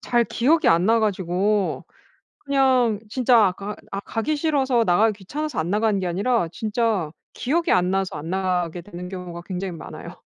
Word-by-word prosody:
잘 240 Hz, -1 st, +2 dB
기억이 300 Hz, +9 st, +2 dB
안 170 Hz, +2 st, +4 dB
나 230 Hz, +1 st, +4 dB
가지고 195 Hz, 0 st, 0 dB, 0.6 s
그냥 260 Hz, -6 st, +2 dB
진짜 250 Hz, +1 st, +3 dB
아 -, -, 0 dB
가 200 Hz, +3 st, -6 dB, 0.2 s
아 195 Hz, -, -3 dB
가기 225 Hz, +9 st, -2 dB
싫어서 275 Hz, -6 st, +1 dB
나가기 210 Hz, +2 st, +3 dB
귀찮아서 290 Hz, -, -4 dB
안 160 Hz, +2 st, -2 dB
나가는 210 Hz, +1 st, +1 dB
게 185 Hz, -, -2 dB
아니라 200 Hz, +3 st, +1 dB
진짜 215 Hz, -6 st, -1 dB, 0.2 s
기억이 325 Hz, +7 st, 0 dB
안 180 Hz, 0 st, +3 dB
나서 195 Hz, -2 st, -1 dB
안 155 Hz, +3 st, -7 dB
나가게 180 Hz, -2 st, -1 dB
되는 180 Hz, -1 st, -9 dB
경우가 180 Hz, -2 st, -7 dB
굉장히 185 Hz, 0 st, -4 dB
많아요. -, -, -9 dB
205 Hz, 345 characters per minute, -23 LUFS, 180-240 Hz, 0.6 s, 안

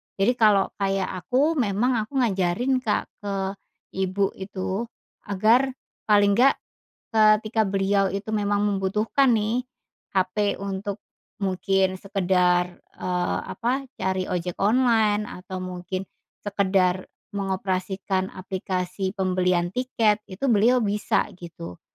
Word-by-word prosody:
jadi 200 Hz, +6 st, +3 dB
kalau 205 Hz, -3 st, +5 dB
kayak 195 Hz, -1 st, 0 dB, 0.2 s
aku 290 Hz, +6 st, +2 dB
memang 230 Hz, +3 st, +1 dB
aku 220 Hz, +6 st, -5 dB
ngajarin 220 Hz, +6 st, +1 dB
Kak 220 Hz, -4 st, 0 dB, 0.2 s
ke 200 Hz, -1 st, -3 dB, 0.6 s
Ibu 190 Hz, +1 st, 0 dB
itu 190 Hz, +3 st, -3 dB, 0.4 s
agar 220 Hz, +7 st, +4 dB, 0.4 s
paling 205 Hz, -1 st, +5 dB
enggak, 270 Hz, +3 st, +5 dB, 0.6 s
ketika 215 Hz, +1 st, +4 dB
beliau 195 Hz, 0 st, +2 dB
itu 200 Hz, +2 st, -5 dB
memang 205 Hz, 0 st, +1 dB
membutuhkan 210 Hz, +7 st, +1 dB
nih 220 Hz, +4 st, 0 dB, 0.5 s
HP 195 Hz, +2 st, +1 dB
untuk 200 Hz, +1 st, -4 dB, 0.4 s
mungkin 190 Hz, -1 st, 0 dB
sekedar, 180 Hz, -2 st, +1 dB, 0.2 s
eee, 180 Hz, -1 st, -1 dB
apa, 255 Hz, +4 st, -1 dB, 0.2 s
cari 190 Hz, 0 st, 0 dB
ojek 180 Hz, -1 st, -3 dB
online 215 Hz, -1 st, +3 dB
atau 185 Hz, 0 st, -7 dB
mungkin 185 Hz, +1 st, -4 dB, 0.4 s
sekedar 190 Hz, -2 st, +1 dB, 0.3 s
mengoperasikan 190 Hz, -1 st, -2 dB
aplikasi 185 Hz, +1 st, -3 dB
pembelian 180 Hz, -2 st, +1 dB
tiket, 225 Hz, -4 st, +1 dB
itu 190 Hz, +7 st, -6 dB
beliau 235 Hz, +4 st, +4 dB
bisa 205 Hz, 0 st, +1 dB, 0.2 s
gitu. 155 Hz, -, -9 dB
195 Hz, 110 wpm, -24 LUFS, 185-215 Hz, 0.6 s, kalau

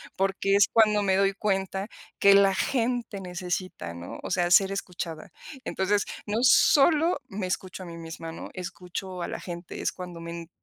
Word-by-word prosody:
Porque, 195 Hz, +1 st, +1 dB
es 200 Hz, +1 st, +6 dB
cuando 215 Hz, -2 st, +4 dB
me 190 Hz, -1 st, +2 dB
doy 195 Hz, 0 st, +3 dB
cuenta 195 Hz, 0 st, -1 dB, 0.3 s
que 200 Hz, 0 st, +7 dB
la 200 Hz, -1 st, +6 dB
gente 235 Hz, -3 st, -1 dB
necesita 180 Hz, -, -4 dB
¿no? 85 Hz, +1 st, -8 dB
O -, -, -5 dB
sea, 175 Hz, -1 st, +1 dB
ser 195 Hz, +2 st, +6 dB
escuchada. 175 Hz, -4 st, -5 dB, 0.3 s
Entonces, 200 Hz, +2 st, 0 dB, 0.2 s
no 210 Hz, +1 st, -1 dB
solo 305 Hz, +5 st, +5 dB
me 190 Hz, -1 st, -4 dB
escucho 185 Hz, 0 st, -4 dB
a -, -, -9 dB
mí 170 Hz, -1 st, -8 dB
misma, 165 Hz, 0 st, -7 dB
¿no? 165 Hz, -, -8 dB
Escucho 180 Hz, 0 st, -6 dB
a -, -, -2 dB
la -, -, -5 dB
gente, 175 Hz, -1 st, -7 dB
es -, -, 0 dB
cuando 180 Hz, -2 st, -8 dB
me 170 Hz, 0 st, -7 dB
190 Hz, 175 wpm, -27 LUFS, 175-200 Hz, 0.3 s, que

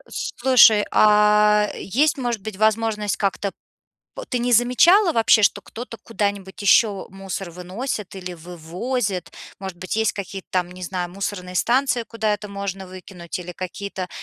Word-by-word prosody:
Слушай, 235 Hz, -4 st, +4 dB
а 210 Hz, 0 st, +4 dB
есть, 285 Hz, +8 st, 0 dB
может 240 Hz, -4 st, -2 dB
быть, 200 Hz, 0 st, -7 dB
возможность 215 Hz, -1 st, +1 dB
как-то 200 Hz, 0 st, -1 dB
п -, -, -30 dB, 0.7 s
ты 250 Hz, -, 0 dB
не 245 Hz, +1 st, -1 dB
замечала 330 Hz, -, +5 dB
вообще, 225 Hz, -1 st, +4 dB
что -, -, +3 dB
кто-то 230 Hz, -1 st, -9 dB
куда-нибудь 200 Hz, -3 st, -3 dB
еще 200 Hz, -1 st, +3 dB
мусор 195 Hz, -1 st, -6 dB
выносит 185 Hz, +5 st, -5 dB
или 180 Hz, -1 st, -6 dB
вывозит? 180 Hz, +4 st, -4 dB, 0.3 s
Может 190 Hz, -2 st, -6 dB
быть, 185 Hz, +1 st, -5 dB
есть 220 Hz, -2 st, +1 dB
какие-то 195 Hz, -1 st, -7 dB
там, 180 Hz, -1 st, -1 dB
не 180 Hz, 0 st, -11 dB
знаю, 180 Hz, 0 st, -3 dB
мусорные 185 Hz, -1 st, -5 dB
станции, 245 Hz, +4 st, +1 dB
куда 220 Hz, -2 st, -2 dB
это 210 Hz, 0 st, -4 dB
можно 200 Hz, -1 st, -5 dB
выкинуть, 185 Hz, -2 st, -8 dB
или 180 Hz, 0 st, -7 dB
какие-то 185 Hz, +1 st, -6 dB
200 Hz, 150 wpm, -22 LUFS, 185-225 Hz, 0.7 s, замечала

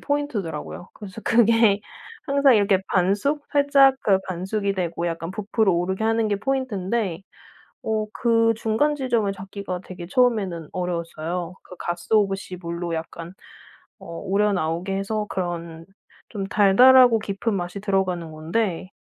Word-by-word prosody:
포인트더라고요. 210 Hz, -, -3 dB
그래서 205 Hz, +1 st, -10 dB
그게 225 Hz, -3 st, +4 dB, 0.5 s
항상 280 Hz, -2 st, +4 dB
이렇게 200 Hz, -2 st, +3 dB
반숙 205 Hz, +11 st, +1 dB
살짝 280 Hz, -2 st, +5 dB
그 195 Hz, -2 st, +3 dB
반숙이 195 Hz, +3 st, -2 dB
되고 170 Hz, -2 st, -2 dB
약간 165 Hz, +1 st, -5 dB
부풀어 210 Hz, 0 st, 0 dB
오르게 185 Hz, +4 st, -1 dB
하는 225 Hz, -1 st, +1 dB
게 205 Hz, -, 0 dB
포인트인데 215 Hz, -7 st, -2 dB, 0.6 s
어 215 Hz, -1 st, -1 dB
그 230 Hz, -1 st, +2 dB
중간 230 Hz, +7 st, +1 dB
지점을 235 Hz, -7 st, 0 dB
잡기가 190 Hz, -1 st, -6 dB
되게 180 Hz, -2 st, -9 dB
처음에는 195 Hz, -, +1 dB
어려웠어요. 175 Hz, -1 st, -4 dB
그 180 Hz, -, -13 dB
가쓰오부시 195 Hz, +1 st, -1 dB
물로 170 Hz, 0 st, -5 dB
약간 165 Hz, +1 st, -6 dB, 0.7 s
어 -, -, -12 dB, 0.2 s
우려 205 Hz, +2 st, +2 dB
나오게 175 Hz, +2 st, -2 dB
해서 210 Hz, +2 st, -2 dB
그런 170 Hz, -3 st, -4 dB, 0.5 s
좀 200 Hz, -3 st, -4 dB
달달하고 245 Hz, +4 st, +6 dB
깊은 210 Hz, +2 st, -2 dB
맛이 180 Hz, +1 st, -4 dB
들어가는 185 Hz, -5 st, -1 dB
건데 170 Hz, +4 st, -2 dB
195 Hz, 310 characters per minute, -23 LUFS, 175-225 Hz, 0.7 s, 달달하고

